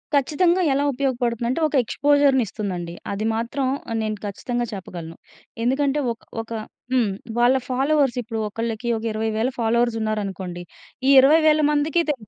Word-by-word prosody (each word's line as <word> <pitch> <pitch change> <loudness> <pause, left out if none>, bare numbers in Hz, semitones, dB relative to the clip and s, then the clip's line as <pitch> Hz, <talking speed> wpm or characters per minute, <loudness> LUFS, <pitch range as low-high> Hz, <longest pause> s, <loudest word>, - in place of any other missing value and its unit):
కచ్చితంగా 340 +6 +2
ఎలా 280 - +1
ఉపయోగపడుతుందంటే, 245 -1 -1
ఒక 300 - -4
ఎక్స్‌పోజర్‌నిస్తుందండి. 230 -10 +1 0.2
అది 200 +2 -2
మాత్రం 240 +4 -2 0.3
ఆహ్, 225 - -1
నేను 215 -1 -2
ఖచ్చితంగా 240 +4 -3
చెప్పగలను. 170 -4 -8 0.5
ఎందుకంటే, 275 +3 +1
ఒక్ 225 - -23 0.2
ఒక 225 - -14 0.4
హ్మ్. 235 -6 +2 0.3
వాళ్ళ 245 +2 +5
ఫాలోవర్స్ 270 0 +2
ఇప్పుడు 225 -1 -5
ఒకళ్ళకి 230 +2 -3
ఒక 220 - -7
20000 220 +2 -1
ఫాలోవర్స్ 235 +1 +2
ఉన్నారనుకోండి. 195 -5 -3 0.5
ఈ - - +5
20000 310 +2 +5
మందికి 300 +3 +2
తె 295 - +3
240 Hz, 130 wpm, -23 LUFS, 215-280 Hz, 0.5 s, వాళ్ళ